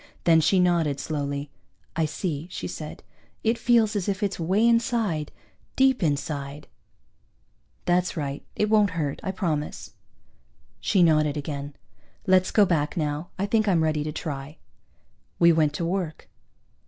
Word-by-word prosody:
Then 165 -1 +5
she 185 +4 +3
nodded, 170 -6 +2
slowly. 140 -1 -3 0.4
"I 165 -1 +1
see," 155 0 -3
she - - -5
said. - - -7 0.4
"It 230 +1 +1
feels 230 -3 +3
as 200 -1 -1
if 200 +1 -2
it's 200 -2 -1
way 190 +7 +2
inside, 230 -9 +1 0.4
deep 265 -2 +3
inside." 145 -2 -2 1.2
"That's 180 0 +1
right. 140 -2 -3
It 210 - +1
won't 205 -5 +3
hurt. 145 -4 -2
I - - -4
promise." 165 -6 -3 0.9
She 190 -4 +3
nodded 155 -2 +3
again. 145 -1 -5 0.5
"Let's 185 -2 +4
go 210 - +5
back, 155 -4 0
now. 150 +1 -2
I 195 - 0
think 215 +1 +1
I'm 175 -5 +3
ready 155 -1 0
to 155 - -3
try." 150 -1 -6 0.8
We 170 0 +6
went 155 -2 +3
to 170 - -2
work. 175 -3 -3
165 Hz, 145 wpm, -25 LUFS, 150-195 Hz, 1.2 s, We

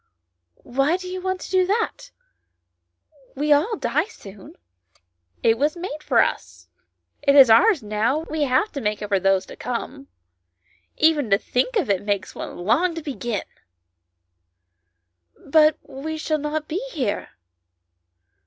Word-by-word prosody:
" - - -55 0.2
Why 275 +7 +1
do 370 -1 -9
you 370 0 -5
want 375 0 -2
to - - -8
do 375 -1 +4
that? 460 +4 -2 1.3
We 295 +2 +3
all 325 +11 +1
die - - 0
soon." 195 - -13 0.4
" 90 +1 -51 0.3
It 225 0 +3
was 300 +4 +1
made 335 -4 -6
for - - +3
us, - - -5 0.5
it 280 -1 +3
is 265 -5 +8
ours 340 - +5
now, 215 +8 0
we 315 0 -3
have 265 +11 +1
to 280 - -5
make 210 -1 -2
it 205 - -5
for 200 -2 +2
those 195 0 +2
to - - -11
come. 265 +3 -5 0.9
Even 305 -6 +3
to 200 - +5
think 250 - -1
of 420 - +1
it 195 -3 +1
makes 205 -2 -2
one - - -7
long 320 - +1
to 330 - -6
begin." 240 -7 -3 1.1
" 85 -1 -33
But 310 -1 +5
we 315 +4 -6
shall 310 0 -1
not 300 +1 -3
be 360 +9 -3
here." 250 -9 -2
275 Hz, 155 wpm, -22 LUFS, 205-315 Hz, 1.3 s, is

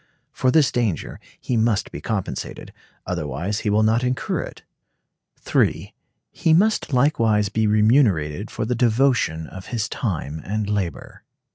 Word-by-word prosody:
For 130 - 0
this 145 0 +4
danger 110 - -2 0.2
he 125 - -2
must 110 -2 +1
be - - -7
compensated, 105 -5 -4 0.3
otherwise 75 +9 -3
he 105 - -2
will 105 +1 +3
not 110 +3 +2
incur 125 +1 -1
it. - - -9 0.7
(3.) - - 0 0.4
He 160 - +1
must 215 -1 +2
likewise 115 -6 +2
be 110 +1 0
remunerated 105 - +2
for - - -3
the 120 - -1
devotion 120 -9 +1
of 95 +4 -10
his 115 -2 -2
time 80 - -3
and 105 +1 -2
labor. 95 -10 -3
110 Hz, 140 wpm, -22 LUFS, 95-125 Hz, 0.7 s, this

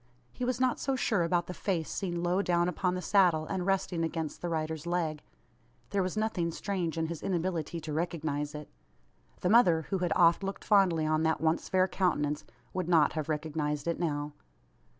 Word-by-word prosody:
He - - -6
was 250 0 0
not 255 -1 +2
so 270 0 0
sure 220 -6 +1
about 170 +1 +1
the 180 - -6
face 175 -4 -2
seen 175 -3 -3
low 180 +2 +2
down 175 -2 +2
upon 180 +1 0
the 180 - -4
saddle, 175 -5 +3
and 185 +2 -3
resting 185 -3 0
against 160 -2 -3
the 175 - -2
rider's 160 0 -3
leg. 165 -4 -1 0.7
There 200 - +1
was 185 +2 -2
nothing 215 -6 0
strange 175 -2 -3
in 160 - 0
his 165 -1 -5
inability 170 -2 -2
to 155 -1 -5
recognise 155 -3 -2
it. 150 -1 -7 0.7
The 180 - +1
mother, 180 -8 +5
who 195 - +1
had 175 -2 -1
oft 170 +1 +5
looked 195 0 -4
fondly 185 -6 +3
on 155 0 +1
that 160 0 +1
once 160 +1 0
fair 185 0 +3
countenance, 150 -6 0 0.3
would 185 -2 -2
not 160 -4 +4
have 155 -1 -3
recognised 150 -1 -2
it 170 - -1
now. 145 -3 -2
170 Hz, 190 wpm, -30 LUFS, 160-185 Hz, 0.7 s, mother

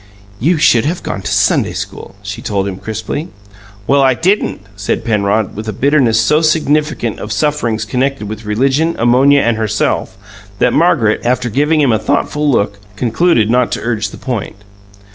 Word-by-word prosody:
"You 165 +8 +2
should 135 -7 +4
have 170 +4 -2
gone 100 - -4
to - - -4
Sunday - - +2
school," - - -7
she 100 0 -6
told 100 -1 -2
him 95 -2 -5
crisply. 110 - -5 0.6
"Well, 140 +4 +3
I 130 -2 +3
didn't!" 185 - 0
said 105 -1 -3
Penrod, 105 -1 0
with 110 +2 -6
a - - -3
bitterness 130 -2 +2
so 150 +8 +3
significant 150 -6 0
of 105 - -6
sufferings 115 -1 -1
connected 130 -1 -2
with 110 +1 -7
religion, 135 +10 +1
ammonia, 130 +4 +4
and 115 -3 +1
herself, 105 -3 -1 0.4
that - - +2
Margaret, 150 -10 +2
after 125 0 0
giving 150 +6 +2
him 135 -4 +3
a 110 - +1
thoughtful 150 +8 0
look, 100 -5 0 0.2
concluded 115 +1 +1
not 125 0 +2
to - - -3
urge 110 -4 -2
the - - -11
point. 120 -5 -4
120 Hz, 170 wpm, -15 LUFS, 110-145 Hz, 0.6 s, should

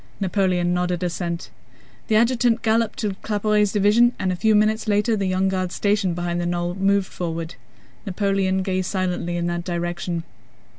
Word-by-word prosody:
Napoleon 185 -3 +1
nodded 180 0 -1
assent. 170 -1 -3 0.6
The 220 - +2
adjutant 235 0 +2
galloped 225 0 +1
to 210 -2 0
Claparède's 210 -1 +1
division 215 +4 +4
and 190 -1 -1
a - - -1
few 220 +4 +2
minutes 215 +1 +2
later 210 +2 +2
the 200 -2 -1
Young 185 +1 +1
Guards 185 -1 -2
stationed 200 -4 +1
behind 175 0 -2
the 175 - -1
knoll 175 0 -1
moved 195 +1 +2
forward. 165 -2 -5 0.5
Napoleon 195 -1 0
gazed 185 -1 -1
silently 180 -2 -2
in 170 - -1
that 175 0 -2
direction. 175 -1 -3
190 Hz, 160 wpm, -22 LUFS, 175-210 Hz, 0.6 s, division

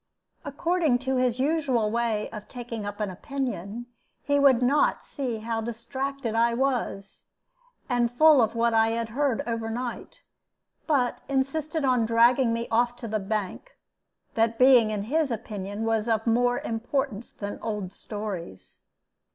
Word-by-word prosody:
According 310 -1 +1
to 265 0 +1
his 250 -1 +1
usual 265 -7 +1
way 230 -2 0
of 210 -2 -8
taking 230 -4 -6
up 205 +1 -6
an 210 -3 -2
opinion, 240 -1 -4 0.4
he 285 0 +2
would 265 -3 +5
not 280 +4 +2
see 255 -6 -4
how 225 +1 -3
distracted 240 +2 -4
I 235 +1 +2
was, 245 -7 -2 0.6
and 240 -2 +1
full 300 +2 +6
of 225 0 +1
what 230 0 +2
I 225 0 +4
had 230 0 -2
heard 265 0 0
overnight, 230 +1 -4 0.6
but 265 -6 +1
insisted 285 +3 -1
on 250 -4 +2
dragging 235 +2 +4
me 230 0 -2
off 240 +1 +2
to 240 -1 -7
the 215 0 -1
bank, 210 - -4 0.6
that 225 0 +1
being 250 -3 +6
in 210 -2 -2
his 300 +6 0
opinion 210 -2 -4
of 225 0 +1
more 245 +1 +2
importance 235 0 -2
than 205 -1 -6
old 210 -4 -4
stories. 200 - -7
235 Hz, 145 wpm, -26 LUFS, 220-265 Hz, 0.6 s, full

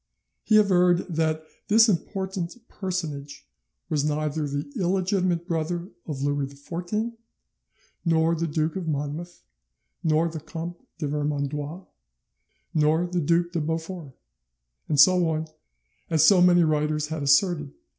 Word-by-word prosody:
He 215 - +4
averred 180 -4 +4
that 160 -1 0 0.2
this 225 +2 +6
important 190 -2 -2
personage 150 -7 -5 0.4
was 150 -2 0
neither 150 0 -1
the 145 0 -3
illegitimate 185 -1 +1
brother 170 +1 -2 0.2
of 140 -4 -4
Louis 145 -1 0
XIV, 175 +11 -4 0.9
nor 165 -1 +3
the 165 0 -1
Duke 155 +1 -1
of 185 -3 -4
Monmouth, 155 +4 -4 0.6
nor 160 +1 +3
the 160 -1 -5
Comte 170 +2 -7
de 155 - -2
Vermandois, 150 +3 -3 0.9
nor 155 +2 +3
the 175 0 -1
Duc 170 +3 +2
de 170 -2 -1
Beaufort, 160 -1 -4 0.8
and 145 - +1
so 180 +3 +6
on, 160 0 -2 0.6
as 160 -2 +4
so 190 -1 +6
many 175 -1 +6
writers 150 -1 0
had 160 -1 -3
asserted." 145 +1 +3
160 Hz, 125 wpm, -25 LUFS, 150-175 Hz, 0.9 s, this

